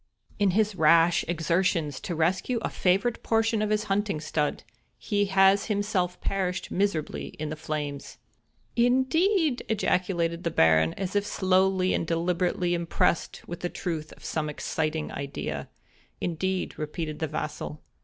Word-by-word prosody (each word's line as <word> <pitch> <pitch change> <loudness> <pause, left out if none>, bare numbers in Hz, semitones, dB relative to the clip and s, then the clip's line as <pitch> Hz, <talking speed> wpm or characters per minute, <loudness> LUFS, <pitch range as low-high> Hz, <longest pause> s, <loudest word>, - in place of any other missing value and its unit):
"In 200 -1 +4
his 215 -1 +2
rash 165 0 +5
exertions 165 -3 0
to 175 - -4
rescue 185 +9 +1
a - - -2
favorite 195 +6 +1
portion 225 -1 +1
of 215 - 0
his 215 0 +1
hunting 200 -4 0
stud, 150 -1 -1 0.3
he 205 -1 0
has 195 0 +4
himself 200 -4 0
perished 185 -2 -2
miserably 190 -6 -1
in 155 0 -4
the - - -3
flames." 150 -2 -5 0.6
"I 235 - +2
n 255 +2 +4
d 320 +5 0
e 380 -3 +3
e - - -2
d 245 - -6
!" - - -31
ejaculated 180 -5 0
the 170 - +1
Baron, 80 - +4
as 190 0 -4
if 205 - +3
slowly 185 0 +2
and 165 - -1
deliberately 175 +1 0
impressed 170 -1 0
with 175 - -6
the 175 - -2
truth 160 -5 -4
of - - -15
some 155 -1 -2
exciting 155 +1 -2
idea. 135 - -5 0.5
"Indeed;" 185 +2 -2
repeated 155 0 -4
the 160 - -1
vassal. 150 0 -5
180 Hz, 160 wpm, -27 LUFS, 155-200 Hz, 0.6 s, rash